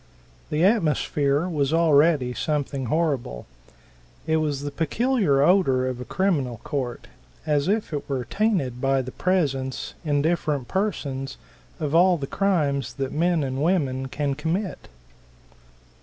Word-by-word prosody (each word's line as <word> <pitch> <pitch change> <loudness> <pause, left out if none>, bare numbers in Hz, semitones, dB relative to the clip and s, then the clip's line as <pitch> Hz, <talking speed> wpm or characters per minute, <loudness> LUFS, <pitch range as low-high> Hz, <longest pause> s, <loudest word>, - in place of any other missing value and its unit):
The 155 +2 0
atmosphere 150 - +1
was 145 -5 0
already 155 -5 +3
something 140 -1 -2
horrible. 135 - -1 0.8
It 160 0 +2
was 150 -3 -1
the 145 - -3
peculiar 165 - +1
odor 145 -7 +3
of 125 -1 -4
a - - -6
criminal 145 -12 0
court, 130 -4 -4 0.4
as 150 0 +1
if 210 -3 0
it 145 - -4
were 130 -3 -2
tainted 175 - 0
by 135 -1 +2
the 130 - -7
presence, 135 -9 -1
in 145 -3 +1
different 150 -5 0
persons, 140 -9 -2 0.4
of 150 -2 -2
all 175 +1 +5
the 140 - -4
crimes 145 - 0
that 135 -2 -3
men 165 0 +1
and 130 0 -3
women 140 -6 0
can 140 +1 -2
commit. 165 +7 -3
145 Hz, 135 wpm, -24 LUFS, 135-170 Hz, 0.8 s, all